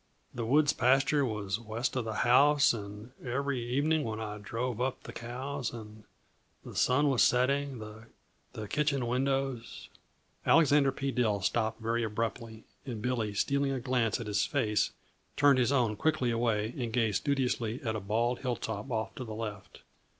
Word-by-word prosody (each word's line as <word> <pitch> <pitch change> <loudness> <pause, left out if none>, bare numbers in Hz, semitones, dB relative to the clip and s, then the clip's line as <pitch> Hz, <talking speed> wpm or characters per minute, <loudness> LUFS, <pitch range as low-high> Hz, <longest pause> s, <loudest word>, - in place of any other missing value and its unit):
The 115 -2 -3
woods 145 +3 +4
pasture 135 +3 +3
was 105 -4 -2
west 115 +3 -3
of 125 -3 -1
the 110 - -3
house, 145 +3 +5
and 105 +1 -8
every 135 0 -2
evening 145 +6 +1
when 110 -3 -4
I 105 -1 -5
drove 115 +3 -3
up 130 0 -2
the - - -9
cows, 130 +2 -4
and 110 -2 -10 0.6
the - - -9
sun 145 +4 +3
was 135 -4 +2
setting, 135 +2 +2
the 110 0 -11
kitchen 140 +1 0
windows 130 -1 -2 0.3
" - - -41
Alexander 145 -3 +5
P. 135 +1 -3
Dill 110 -6 +1
stopped 110 +2 0
very 115 +1 0
abruptly, 110 +1 -4 0.2
and 120 -5 -5
Billy, 110 -3 -1
stealing 140 +6 +1
a 130 - -2
glance 125 -2 0
at 115 - -5
his 105 -1 +1
face, 105 -1 +1 0.5
turned 140 -2 +5
his 125 +1 +2
own 120 -6 +2
quickly 125 0 +1
away 115 -1 0
and 120 -4 -3
gazed 110 -4 +1
studiously 125 -4 -1
at 110 -3 -1
a - - -2
bald 115 +5 0
hilltop 120 -2 -3
off 110 -2 -2
to - - -6
the 110 -3 -7
left. 105 -4 -7
120 Hz, 165 wpm, -30 LUFS, 110-135 Hz, 0.6 s, house